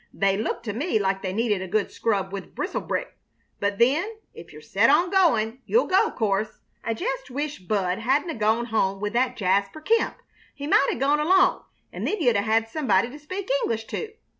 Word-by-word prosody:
They 195 -1 +2
look 220 +3 -3
to 210 -3 -4
me 285 - 0
like 195 -2 0
they 185 - -3
needed 210 -1 0
a 190 - -5
good 210 +3 0
scrub 195 -4 -1
with 195 - -7
Bristol - - -2
brick. - - -4 0.4
But 200 0 -1
then, 305 - +2 0.2
if - - -12
you're - - -11
set - - +2
on 350 +1 +4
going, 255 - +2
you'll 475 - +3
go, 375 +1 +3
'course. 210 -1 -1 0.2
I 230 - -2
jest - - -3
wish 290 +1 -4
Bud 185 0 -1
hadn't 270 +8 +1
'a' - - -4
gone 220 +2 +1
home 195 -4 0
with 210 +1 -3
that 250 +1 +1
Jasper 200 +7 0
Kemp. 450 +9 +1 0.4
He 285 - -6
might 280 -2 +4
'a' - - -2
gone 280 +4 +2
along, 370 +4 +3 0.3
an' - - -4
then 425 - -1
you'd 245 -8 +3
'a' 200 - +3
had 225 +2 +1
somebody 240 -5 +1
to 295 - -10
speak 370 +6 -6
English 225 -1 -2
to." 440 -1 -4
230 Hz, 210 wpm, -25 LUFS, 205-300 Hz, 0.4 s, on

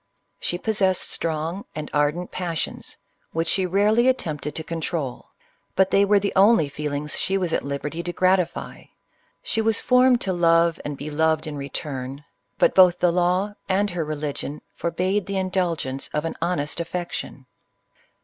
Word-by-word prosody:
She 175 - -2
possessed 190 -2 0
strong 165 +4 -3
and 155 -1 -5
ardent 150 +4 0
passions, 170 -3 -4 0.4
which 165 +1 0
she 190 +2 +1
rarely 210 +6 +3
attempted 150 - -1
to 160 - -3
control, 160 -5 -4 0.2
— - - -43
but 190 0 +3
they 200 0 +5
were 205 +1 +4
the 200 0 -2
only 195 -6 +5
feelings 150 0 -3
she 195 - 0
was 180 -4 -1
at - - +1
liberty 140 +4 -4
to 175 - -4
gratify: 185 0 0 0.6
she 225 - 0
was 220 -1 +2
formed 250 -1 +4
to 190 - -1
love, 170 -1 +3
and 145 -1 -4
be 150 +2 -6
loved 160 +1 +1
in 155 -1 -5
return, 140 -1 -5 0.3
but - - +4
both 180 -2 +6
the 175 - +3
law 180 +4 +1 0.2
and 200 +1 +2
her 175 -2 -2
religion 150 -1 -4
forbade 185 +4 -1
the 200 -1 -2
indulgence 175 -8 -1
of 150 +1 0
an 165 - -3
honest 170 -3 -1
affection. 170 -5 -5
170 Hz, 160 wpm, -24 LUFS, 150-190 Hz, 0.6 s, both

